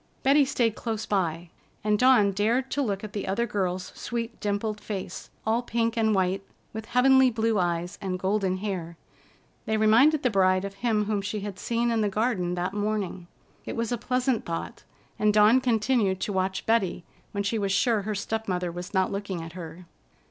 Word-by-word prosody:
Betty 280 +1 +5
stayed 235 -4 +1
close 220 -1 -4
by, 170 -4 -1 0.3
and 210 0 +2
Dawn 250 -6 +5
dared 230 +7 0
to 285 - 0
look 200 -6 -2
at 210 - -7
the 205 - -4
other 205 +5 0
girl's 185 -4 -2
sweet 235 -1 -4
dimpled 210 +1 -2
face, 190 -4 -6 0.2
all 225 +2 +2
pink 230 -1 -1
and 220 -2 +2
white, 190 +1 +1 0.3
with 220 0 -6
heavenly 265 +1 +5
blue 225 -2 0
eyes 175 0 -1
and 185 -2 -2
golden 190 0 0
hair. 185 -4 -4 0.7
They 220 - +1
reminded 240 +8 +5
the 250 - +2
bride 185 -1 +3
of 200 - -6
him 215 0 0
whom 210 -1 -1
she 205 +1 -4
had 200 -1 -6
seen 235 0 0
in 225 -1 +1
the 210 - +1
garden 200 -4 0
that 180 +2 -2
morning. 205 -4 -2 0.4
It - - -5
was 230 0 -2
a 240 - 0
pleasant 250 0 0
thought, 165 -1 -5 0.4
and 210 0 +4
Dawn 215 +4 +5
continued 225 -5 +1
to 205 - -2
watch 190 0 -1
Betty, 210 -6 +1 0.3
when 200 -1 -2
she 215 +2 -1
was 200 -1 -1
sure 210 +3 +2
her 210 +1 -3
step 220 +2 -3
mother 180 -2 -1
was 175 +3 -7
not 190 0 +2
looking 195 -4 -4
at 165 0 -9
her. 170 0 -9
210 Hz, 190 wpm, -26 LUFS, 190-230 Hz, 0.7 s, Betty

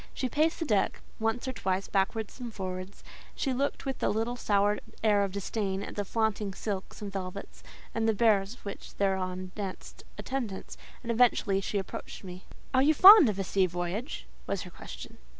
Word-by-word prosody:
She 260 - -1
paced 315 +4 +2
the 330 - -2
deck 210 -8 +1 0.2
once 225 +3 -1
or 260 - -2
twice 190 -4 -1
backwards 210 +4 -1
and 245 -2 -5
forwards; 185 -1 -6 0.3
she 270 - -1
looked 280 +3 -1
with 270 -1 -3
a - - +2
little 225 +3 -1
sour 205 -3 +2 0.2
air 210 -2 +4
of 195 - -2
disdain 200 0 -2
at - - -7
the 205 - -1
flaunting 210 -2 -1
silks 200 0 -5
and 200 -1 -6
velvets, 190 0 -6 0.3
and 225 0 +1
the - - +3
bears 210 -1 +3
which 200 - -7
thereon 185 -2 -1
danced 195 -3 -6 0.2
attendance, 240 -8 -4 0.3
and 235 - -2
eventually 225 -4 +3
she 205 - -2
approached 195 +1 -6
me 185 -2 -7
and - - -15
spoke. - - -18 0.2
"Are - - +6
you 300 +3 +5
fond 380 - +10
of 200 - -2
a 195 - -1
sea 190 0 +2
voyage?" 175 - -4 0.2
was 200 - -2
her 180 - -10
question. - - -10
205 Hz, 190 wpm, -29 LUFS, 190-235 Hz, 0.3 s, fond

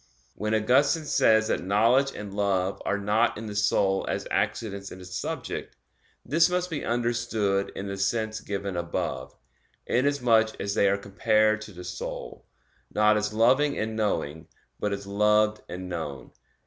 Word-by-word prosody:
When 105 +2 -1
Augustine 140 +8 +3
says 110 -6 +3
that - - 0
knowledge 115 +8 +3
and 100 -2 -7
love 100 -2 0
are 100 - +1
not 105 +3 +1
in 110 - -6
the 105 - -5
soul 100 -1 +2
as - - -2
accidents 100 -3 -2
in 95 - -9
a 90 - -10
subject, 90 0 -5 0.5
this 165 +6 +4
must 180 0 -1
be 155 - -3
understood 115 -4 0
in 95 - -5
the 100 0 -4
sense 110 +2 -1
given 100 -1 -4
above, 85 -6 -3 0.5
inasmuch 125 -4 +2
as 100 0 -2
they 100 - +3
are 100 - +2
compared 110 +2 +2
to 110 - -9
the 90 -2 -10
soul, 90 - -7 0.4
not 105 0 +4
as 105 0 0
loving 130 +7 +3
and 110 0 -2
knowing, 80 -8 -2 0.3
but 105 - -1
as 100 0 -4
loved 105 +1 +2
and 90 +1 -6
known. 75 -7 -6
105 Hz, 160 wpm, -27 LUFS, 100-115 Hz, 0.5 s, this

